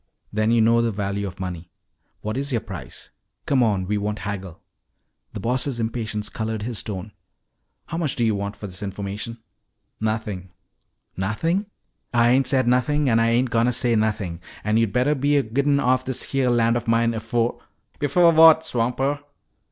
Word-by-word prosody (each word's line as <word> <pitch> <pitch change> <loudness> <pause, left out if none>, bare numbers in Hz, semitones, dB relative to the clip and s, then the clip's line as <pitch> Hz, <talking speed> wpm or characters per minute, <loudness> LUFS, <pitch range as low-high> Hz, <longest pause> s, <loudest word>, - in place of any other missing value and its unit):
"Then 110 +1 +1
you 115 0 +4
know 115 +1 +4
the 115 -1 +1
value 100 0 -2
of 95 -1 -9
money. 90 -2 -5 0.5
What 110 +1 -3
is 140 +2 -2
your 115 -3 0
price? 95 -7 -9 0.3
Come 135 -3 +2
on, 100 -5 +2
we 105 +2 -1
won't 105 +1 -2
haggle." 95 -4 -5 0.7
The - - -5
Boss' 125 +2 0
impatience 110 -2 -2
colored 110 -1 -4
his 115 -3 -3
tone. 105 -1 -6 0.7
"How 165 - -5
much 155 -5 0
do 120 - +1
you 110 - +2
want 100 0 -3
for 100 - -8
this 95 -1 -7
information?" 100 +3 -5 0.6
"Nothin'!" 110 -4 -3 0.7
"Nothing?" 165 - -1 0.5
"Ah 120 0 +5
ain't 130 +2 +4
said 130 -1 +2
nothin' 135 +4 +2
an' 115 -1 +4
Ah 115 - +3
ain't 120 +2 +2
a - - -21
goin' 115 +1 +3
to 125 - +1
say 120 -1 +2
nothin'. 105 -6 -1 0.2
An' 105 +1 +1
yo' 115 0 +3
bettah 125 +7 +2
be 145 +1 +2
a 140 - +3
gittin' 140 +5 +1
offen 130 0 +2
this 130 - -2
heah 135 -2 +2
land 115 -1 +3
of 120 - -3
mine 115 0 +2
afo' 115 +1 -1 0.2
" - - -37
"Before 170 +4 +4
what, 160 0 +7
swamper?" 130 +1 0
115 Hz, 185 wpm, -23 LUFS, 105-130 Hz, 0.7 s, what